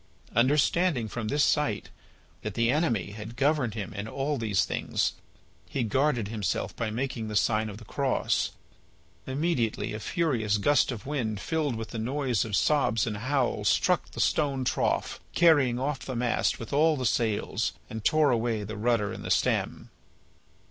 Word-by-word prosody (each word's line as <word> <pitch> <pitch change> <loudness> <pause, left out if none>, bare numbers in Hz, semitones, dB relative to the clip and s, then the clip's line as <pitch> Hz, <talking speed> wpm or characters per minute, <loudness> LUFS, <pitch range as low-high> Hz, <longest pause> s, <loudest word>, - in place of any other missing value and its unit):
Understanding 140 +2 +3
from 110 0 -4
this 145 +6 +2
sight 135 -9 +1 0.5
that 105 -1 -5
the 115 +1 +2
Enemy 120 - 0
had 110 +2 -8
governed 140 -4 +1
him 105 -3 -5
in 100 +2 -5
all 140 +4 -2
these 105 -4 +1
things, - - -1 0.6
he 130 - -1
guarded 125 0 +1
himself 105 -5 -2
by 115 -2 -2
making 115 0 -3
the 105 - -5
sign 110 +1 +2
of 105 - -8
the 115 - -12
Cross. 135 +4 0 0.8
Immediately 130 -7 -1
a 105 - -4
furious 115 - 0
gust 145 +6 +3
of 115 -4 -7
wind 120 -8 -2
filled 155 -3 -1
with 115 0 -5
the 115 - -5
noise 130 0 0
of 110 -3 -2
sobs 115 -8 +2
and 105 -3 -3
howls 130 +3 0
struck - - +2
the - - -9
stone 140 -4 +1
trough, - - 0 0.2
carried 145 -8 +5
off 135 +1 -1
the 130 - -6
mast 120 0 0
with 115 - -7
all 155 +2 +4
the 130 - -2
sails, 110 -3 0
and 110 -1 -6
tore 155 0 +4
away 115 -2 0
the 110 +2 -6
rudder 110 -2 +1
and - - -8
the - - -5
stem. - - 0
120 Hz, 170 wpm, -28 LUFS, 110-140 Hz, 0.8 s, carried